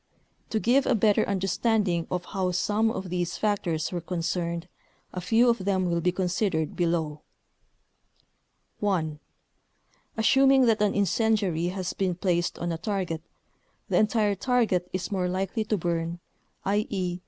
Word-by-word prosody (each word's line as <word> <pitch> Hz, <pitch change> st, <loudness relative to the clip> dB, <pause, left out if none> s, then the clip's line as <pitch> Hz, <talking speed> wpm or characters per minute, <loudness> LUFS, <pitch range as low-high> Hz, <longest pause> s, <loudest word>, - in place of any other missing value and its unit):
To 220 Hz, -, 0 dB
give 255 Hz, +5 st, +3 dB
a 260 Hz, -, +3 dB
better 210 Hz, -1 st, +3 dB
understanding 195 Hz, -2 st, +1 dB
of 180 Hz, 0 st, -2 dB
how 190 Hz, -3 st, -1 dB
some 210 Hz, +5 st, +1 dB
of 190 Hz, -5 st, -5 dB
these 175 Hz, -1 st, -2 dB
factors 180 Hz, -7 st, -1 dB
were 175 Hz, -2 st, -3 dB
concerned 170 Hz, 0 st, -2 dB, 0.5 s
a 180 Hz, -, -4 dB
few 225 Hz, +7 st, +3 dB
of 230 Hz, -5 st, +2 dB
them 190 Hz, -1 st, +1 dB
will 170 Hz, -1 st, 0 dB
be 180 Hz, -, +2 dB
considered 180 Hz, -3 st, -1 dB
below: 165 Hz, -3 st, -1 dB, 1.6 s
(1) 165 Hz, -7 st, -1 dB, 1.0 s
Assuming 270 Hz, +3 st, +5 dB
that 225 Hz, -3 st, +2 dB
an 210 Hz, -1 st, +2 dB
incendiary 200 Hz, -4 st, +1 dB
has 185 Hz, 0 st, -3 dB
been 185 Hz, -2 st, -1 dB
placed 175 Hz, -1 st, 0 dB
on 170 Hz, 0 st, -2 dB
a 165 Hz, -, -3 dB
target, 180 Hz, -4 st, -2 dB, 0.7 s
the -, -, +2 dB
entire 215 Hz, -1 st, +2 dB
target 200 Hz, -5 st, +1 dB
is 185 Hz, +3 st, -3 dB
more 185 Hz, -2 st, 0 dB
likely 190 Hz, +4 st, -1 dB
to 210 Hz, -, 0 dB
burn, 170 Hz, -1 st, -2 dB, 0.5 s
i.e. 195 Hz, -3 st, -1 dB
185 Hz, 140 wpm, -27 LUFS, 175-210 Hz, 1.6 s, Assuming